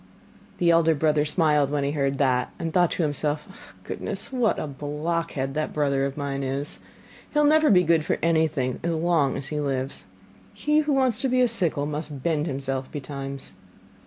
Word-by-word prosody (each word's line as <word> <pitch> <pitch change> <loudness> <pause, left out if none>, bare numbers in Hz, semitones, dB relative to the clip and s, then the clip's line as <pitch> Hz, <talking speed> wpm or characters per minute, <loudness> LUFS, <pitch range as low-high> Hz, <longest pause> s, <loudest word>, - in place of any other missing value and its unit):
The 170 -1 +3
elder 165 -1 +4
brother 150 0 +2
smiled 150 -3 +2
when 145 -1 0
he 140 - 0
heard 140 -2 0
that, 130 -3 +1
and 165 -1 -4
thought 175 -2 +4
to 175 - -1
himself: 150 0 -3
'Goodness, - - -5
what 245 -4 +2
a - - -2
blockhead 150 0 -3
that 155 +1 -2
brother 140 -2 +1
of 140 - -8
mine 140 -1 -3
is! 135 +2 -3 0.5
He - - -3
will 295 - +5
never 310 0 +5
be 180 -5 +6
good 165 -2 +3
for - - 0
anything 160 -6 +1
as 170 0 -1
long 160 -4 +1
as 140 0 -5
he 150 - -2
lives! 135 -7 -3 0.5
He 300 +9 +2
who 300 -1 +1
wants 260 -5 +2
to 270 - +1
be 255 0 +3
a 250 - +5
sickle 175 -10 +1
must 150 -2 -5
bend 160 -2 0
himself 135 -2 -3
betimes. 140 -1 -6
150 Hz, 190 wpm, -25 LUFS, 140-170 Hz, 0.5 s, be